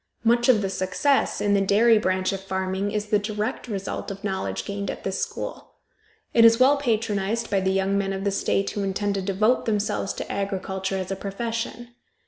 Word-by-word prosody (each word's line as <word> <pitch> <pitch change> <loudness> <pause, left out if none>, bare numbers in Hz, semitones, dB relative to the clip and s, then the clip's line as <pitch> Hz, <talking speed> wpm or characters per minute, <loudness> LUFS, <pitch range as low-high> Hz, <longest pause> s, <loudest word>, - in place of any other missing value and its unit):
Much 240 +2 +3
of 220 -5 +5
the - - +1
success 190 +10 +1
in 205 -1 +1
the 200 - +3
dairy 215 +3 +5
branch 185 -1 0
of 195 - -4
farming 190 +1 -2
is 210 0 -3
the 210 - +3
direct 210 +3 -3
result 195 -4 -4
of 195 +1 -7
knowledge 190 -2 -3
gained 200 -1 -4
at - - -6
this 190 - -2
school. - - -5 0.6
It 230 - +6
is 230 +1 +7
well 275 +3 +6
patronized 225 -3 -1
by 200 - +3
the 190 0 0
young 195 +1 +1
men 195 -1 -1
of 195 0 -3
the 200 - +1
state 195 0 0
who 205 - -3
intend 200 +1 -1
to 195 - -1
devote 205 +6 +1
themselves 210 -2 -1
to - - -6
agriculture 190 -1 -2
as 185 0 -4
a - - 0
profession. 230 +4 -4
200 Hz, 200 wpm, -24 LUFS, 195-220 Hz, 0.6 s, is